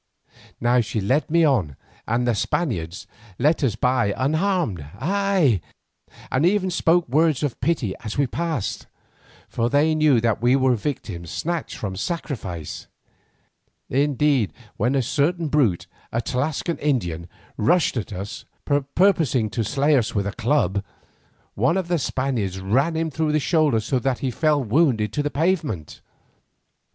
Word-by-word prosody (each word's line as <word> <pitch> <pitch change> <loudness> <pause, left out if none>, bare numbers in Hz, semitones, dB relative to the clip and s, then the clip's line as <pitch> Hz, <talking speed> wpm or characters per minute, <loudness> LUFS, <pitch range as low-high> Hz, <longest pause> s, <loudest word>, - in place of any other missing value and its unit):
Now 120 +1 +3
she 110 0 -3
led 130 +12 +1
me 165 +1 +4
on, 100 - +1 0.3
and 120 +2 +1
the 120 - +3
Spaniards 100 - -2 0.3
let 155 +1 +2
us 120 -6 +1
by 115 -4 +1
unharmed, 155 - 0
ay, 180 - +1 0.7
and 130 - +1
even 185 +1 +2
spoke 175 0 +2
words 155 +2 +2
of 145 -5 -2
pity 130 - 0
as 110 -3 -6
we 140 - +3
passed, 145 - -3 0.6
for 115 0 -1
they 145 +3 +3
knew 155 -5 +4
that 115 -1 0
we 120 +2 +4
were 130 -1 +3
victims 105 - -4
snatched 170 0 -3
from 95 -3 -4
sacrifice. 95 - -5 1.0
Indeed, 140 -4 +2 0.2
when 125 +6 0
a 135 - +2
certain 155 +5 0
brute, 130 - +2 0.3
a 115 - 0
Tlascalan 145 +7 -2
Indian, 90 - -1 0.3
rushed 175 -2 +2
at 110 -3 -3
us, 100 +1 -6 0.5
purposing 155 - +3
to 115 - -1
slay 145 +5 +2
us 120 -5 0
with 100 -1 0
a 100 - -2
club, 105 -5 0 0.7
one 125 - +1
of 185 -3 -2
the 175 -2 +1
Spaniards 125 -9 -2
ran 130 - +1
him 160 0 -1
through 155 +1 0
the 155 - +3
shoulder 150 -6 +2
so 125 +4 -1
that 130 0 0
he 130 - -2
fell 150 +1 +1
wounded 115 - +2
to 145 - 0
the 145 - -1
pavement. 150 - -1
135 Hz, 150 wpm, -23 LUFS, 110-155 Hz, 1.0 s, me